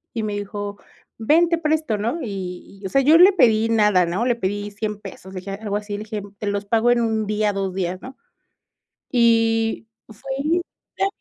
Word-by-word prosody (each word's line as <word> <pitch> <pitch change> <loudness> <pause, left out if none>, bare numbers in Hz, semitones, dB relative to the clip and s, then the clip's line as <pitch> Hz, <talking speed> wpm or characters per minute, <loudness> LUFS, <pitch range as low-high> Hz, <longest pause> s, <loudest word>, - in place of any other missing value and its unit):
Y 225 - -2
me 210 -1 -2
dijo: 205 0 -5 0.4
"Ven, 320 +9 +4
te 335 - +2
presto, 310 -8 0
¿no?" 230 +10 -2
Y 195 -3 -7
y - - -6
o - - -8
sea, 275 - +3
yo 300 +4 +6
le 370 +4 +8
pedí 225 - +3
nada, 210 -5 +4
¿no? 180 +7 -1
Le 245 -1 +2
pedí 205 -1 -3
100 210 0 -4
pesos, 190 -1 -11
le 185 - -5
dije, 195 - -7
algo 205 +1 -4
así, 210 0 -6
le 205 - -3
dije: 215 -1 -5 0.2
"Te 210 - -4
los 205 0 -2
pago 225 +3 +2
en 240 -1 +3
1 220 -2 0
día, 210 0 0
2 195 -1 -2
días, 185 0 -2
¿no?" 260 +1 -10 0.9
Y 225 -2 +2 0.2
fue 225 +5 -11
y 320 +5 +1 0.4
te 390 - +1
215 Hz, 210 wpm, -22 LUFS, 200-240 Hz, 0.9 s, le